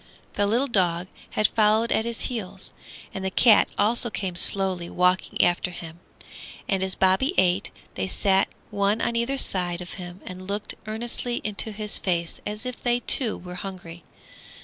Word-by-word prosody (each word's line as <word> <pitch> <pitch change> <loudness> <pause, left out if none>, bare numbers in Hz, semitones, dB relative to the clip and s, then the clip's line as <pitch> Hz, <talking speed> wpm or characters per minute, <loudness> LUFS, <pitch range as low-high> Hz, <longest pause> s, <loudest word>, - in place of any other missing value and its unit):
The 205 - +1
little 235 +6 +2
dog 180 -7 +1 0.3
had 215 - +3
followed 220 +1 +2
at 220 - +1
his 235 -1 -1
heels, 195 -6 -5 0.4
and 190 - -5
the 190 - -1
cat 215 +3 +5
also 230 +3 +2
came 190 -4 -4
slowly 185 -1 +4
walking 180 +1 +1
after 175 +1 +1
him, 170 -1 -9 0.7
and 195 -1 0
as 190 0 +1
Bobby 190 - +2
ate, 180 -1 +2 0.2
they 95 - -3
sat 190 - +2 0.2
one 205 +1 +1
on 235 - -1
either 235 +4 0
side 180 -7 +1
of 180 -1 -5
him 175 +1 -9
and 185 0 -9
looked 205 +1 -3
earnestly 240 +2 -3
into 210 +1 -2
his 210 0 -4
face 170 -3 -2
as 210 +3 -6
if 250 -1 -6
they 240 0 +1
too 240 -4 +3
were 180 0 -10
hungry. 180 -3 -8
195 Hz, 170 wpm, -24 LUFS, 180-220 Hz, 0.7 s, cat